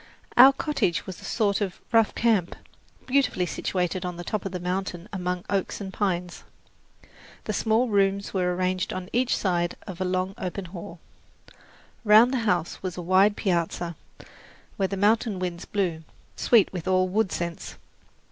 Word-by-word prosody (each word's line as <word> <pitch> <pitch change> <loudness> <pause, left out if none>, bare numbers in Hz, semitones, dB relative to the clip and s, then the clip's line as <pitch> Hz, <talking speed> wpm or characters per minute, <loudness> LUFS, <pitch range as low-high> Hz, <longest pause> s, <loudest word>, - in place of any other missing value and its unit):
Our 260 +3 +10
cottage 275 - -1
was 185 - -8
a - - -10
sort 205 -2 0
of 190 -3 -3
rough 225 -2 +3
camp, 220 -7 +1 0.5
beautifully 260 -8 +1
situated 180 +1 -2
on 180 -1 -4
the 175 - -6
top 210 +2 -3
of 195 - -3
the 180 - -4
mountain 180 0 -3
among 180 -1 -3
oaks 195 -2 -1
and 190 -2 -6
pines. 180 -4 -2 1.0
The - - -3
small 225 +3 +2
rooms 200 -2 +1
were 180 -2 0
arranged 185 0 -1
on 185 0 -6
each 250 +1 +2
side 175 -3 0
of 190 -2 -8
a - - +2
long 185 +1 -1
open 185 +1 -4
hall. 170 -1 -9 1.0
Round 220 +4 +6
the 260 - +1
house 175 -2 -1
was 185 -2 -5
a - - -3
wide 190 +4 +4
piazza, 170 -2 -1 0.8
where 195 - 0
the 195 - -4
mountain 215 +1 +2
winds 180 -2 -4
blew, 175 -6 -2 0.3
sweet 225 -6 +3
with 180 -4 -5
all 185 0 +3
wood 195 +1 0
scents. 170 -1 -4
185 Hz, 165 wpm, -26 LUFS, 180-205 Hz, 1.0 s, Our